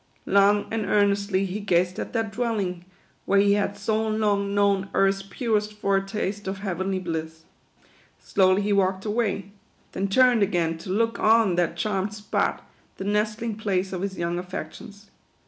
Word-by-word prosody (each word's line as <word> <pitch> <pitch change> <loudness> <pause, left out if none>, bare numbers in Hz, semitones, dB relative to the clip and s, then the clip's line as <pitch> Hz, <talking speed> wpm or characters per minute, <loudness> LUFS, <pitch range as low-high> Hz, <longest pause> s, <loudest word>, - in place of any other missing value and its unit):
Long 200 +1 +4
and 225 -1 -1
earnestly 200 -1 +2
he 195 +2 -4
gazed 180 -2 +1
at - - -4
that 225 -3 -1
dwelling, 200 -6 -2 0.4
where 200 - +2
he 200 0 +4
had 205 0 -1
so 220 +2 0
long 205 -2 0
known 200 -1 +2
earth's 195 0 +2
purest 210 +1 -2
foretaste 200 0 -1
of 190 +1 -3
heavenly 190 0 -2
bliss. 160 -2 -5 0.7
Slowly 190 +1 +2
he 205 0 +1
walked 190 0 +1
away; 210 -3 -1 0.4
then 195 - -2
turned 245 +2 +4
again 170 -5 0
to 185 - -9
look 230 +4 0
on 220 -3 +4
that 170 -1 0
charmed 200 +1 -1
spot, 210 0 -2 0.3
the - - -5
nest 210 +2 0
ling 225 -3 -3
place 190 -3 -1
of 180 - -3
his 195 -1 -4
young 170 0 -2
affections. 190 +4 -8
200 Hz, 160 wpm, -25 LUFS, 190-210 Hz, 0.7 s, Long